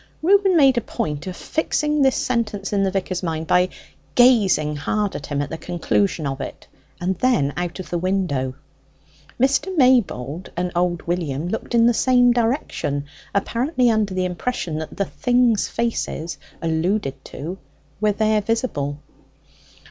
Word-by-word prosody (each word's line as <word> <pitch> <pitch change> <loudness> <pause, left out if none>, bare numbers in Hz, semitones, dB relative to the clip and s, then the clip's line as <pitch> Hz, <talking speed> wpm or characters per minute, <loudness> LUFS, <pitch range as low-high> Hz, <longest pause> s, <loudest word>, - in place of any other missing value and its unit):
Reuben 385 0 +4
made 270 -5 +5
a - - -7
point 150 -4 -4
of 185 - -5
fixing 300 -1 0
this 265 -1 +4
sentence 210 -5 -1
in 200 - +2
the 195 - +2
vicar's 185 -1 -2
mind 160 -3 -2
by 180 +3 +3 0.5
gazing 205 -12 +4
hard 205 +7 -1
at 140 - -6
him 145 -1 -1
at 145 - -7
the 160 - -5
conclusion 175 -1 0
of 135 0 -3
it, 130 - -7 0.3
and 180 +1 -2
then 145 - +2
out 175 +1 -3
of 185 - -8
the 175 - 0
window. 170 -9 -1 0.8
Mr. 275 +9 +2
Maybold 190 - +2
and 180 0 -1
old 175 0 0
William 170 -2 -2
looked 220 +3 -3
in 230 0 +5
the 240 - +5
same 245 +1 +4
direction, 230 - -1 0.3
apparently 245 +4 +1
under 210 -4 0
the 185 0 0
impression 180 -3 -3
that 160 - -7
the 200 - +1
things' 245 -3 +2
faces 225 -8 -3 0.2
alluded 165 -3 -1
to 170 +7 -7 0.4
were 210 0 +3
there 215 +1 +2
visible. 200 - -1
190 Hz, 155 wpm, -22 LUFS, 160-240 Hz, 0.8 s, made